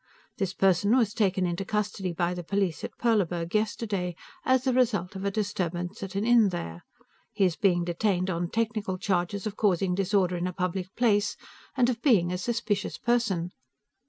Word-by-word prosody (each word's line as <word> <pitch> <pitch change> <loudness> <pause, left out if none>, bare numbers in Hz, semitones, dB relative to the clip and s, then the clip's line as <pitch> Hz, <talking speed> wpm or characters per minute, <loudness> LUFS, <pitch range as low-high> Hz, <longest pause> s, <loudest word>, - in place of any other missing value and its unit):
This 195 -3 0
person 195 +5 +3
was 220 -5 +2
taken 190 -3 +1
into 175 +2 -2
custody 200 -2 -2
by 175 +1 -1
the 180 - -5
police 195 -2 -1
at - - -6
Perleburg 175 -7 0
yesterday, 210 -4 -1 0.3
as 260 -3 +2
a 260 - +2
result 220 -8 +1
of 190 - -5
a - - +2
disturbance 180 -4 -3
at 195 -1 -6
an 200 +2 0
inn 235 -3 +5
there; 85 - -5 0.5
he 200 - +3
is 175 -3 +1
being 180 -4 +2
detained 180 +1 0
on 170 0 -2
technical 215 -4 -1
charges 185 +1 -1
of 215 -1 -3
causing 190 -3 +2
disorder 190 -1 +1
in 175 +1 -1
a 180 - -4
public 180 0 -2
place, 215 -4 +2 0.4
and 245 -2 +4
of 240 -2 -1
being 190 - +4
a 180 - -2
suspicious 225 0 -2
person. 220 -8 0
195 Hz, 180 wpm, -27 LUFS, 180-215 Hz, 0.5 s, inn